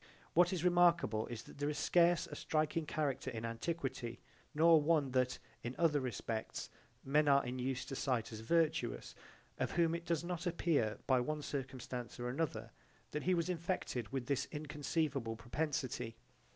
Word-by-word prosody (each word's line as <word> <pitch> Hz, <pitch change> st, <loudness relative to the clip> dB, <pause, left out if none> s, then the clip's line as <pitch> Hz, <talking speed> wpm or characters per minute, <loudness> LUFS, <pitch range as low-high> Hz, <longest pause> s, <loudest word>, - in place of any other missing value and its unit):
What 175 Hz, +1 st, +5 dB
is 180 Hz, -3 st, -1 dB
remarkable 170 Hz, -11 st, +4 dB
is 120 Hz, -2 st, -6 dB
that -, -, -14 dB
there 145 Hz, +1 st, 0 dB
is 150 Hz, -, -3 dB
scarce 170 Hz, +3 st, +4 dB
a 160 Hz, -4 st, -8 dB
striking 155 Hz, +1 st, 0 dB
character 145 Hz, -4 st, -1 dB
in 115 Hz, -2 st, -4 dB
antiquity, 125 Hz, -1 st, -3 dB, 0.4 s
nor 160 Hz, 0 st, +7 dB
one 150 Hz, -3 st, +2 dB
that 125 Hz, 0 st, +1 dB, 0.2 s
in 120 Hz, +2 st, -4 dB
other 160 Hz, -4 st, +3 dB
respects 115 Hz, -3 st, -4 dB, 0.3 s
men 150 Hz, +2 st, +3 dB
are 140 Hz, -1 st, +5 dB
in 125 Hz, +1 st, -3 dB
use 130 Hz, 0 st, -2 dB
to 135 Hz, -, -5 dB
cite 125 Hz, -4 st, 0 dB
as 110 Hz, -, -6 dB
virtuous, 160 Hz, 0 st, +1 dB, 0.5 s
of -, -, -1 dB
whom 165 Hz, -1 st, +3 dB
it 170 Hz, +1 st, -4 dB
does 170 Hz, -1 st, +1 dB
not 175 Hz, +1 st, -3 dB
appear 160 Hz, -10 st, +1 dB
by 130 Hz, -2 st, +4 dB
one 150 Hz, +4 st, -2 dB
circumstance 130 Hz, -3 st, -5 dB
or 120 Hz, 0 st, -2 dB
another, 125 Hz, -5 st, -2 dB, 0.4 s
that 150 Hz, -, -2 dB
he 185 Hz, +3 st, +2 dB
was 170 Hz, 0 st, 0 dB
infected 170 Hz, -, -2 dB
with 135 Hz, -2 st, -2 dB
this 140 Hz, +1 st, 0 dB
inconceivable 150 Hz, -5 st, -2 dB
propensity. 130 Hz, -2 st, -2 dB
145 Hz, 165 wpm, -36 LUFS, 125-165 Hz, 0.5 s, nor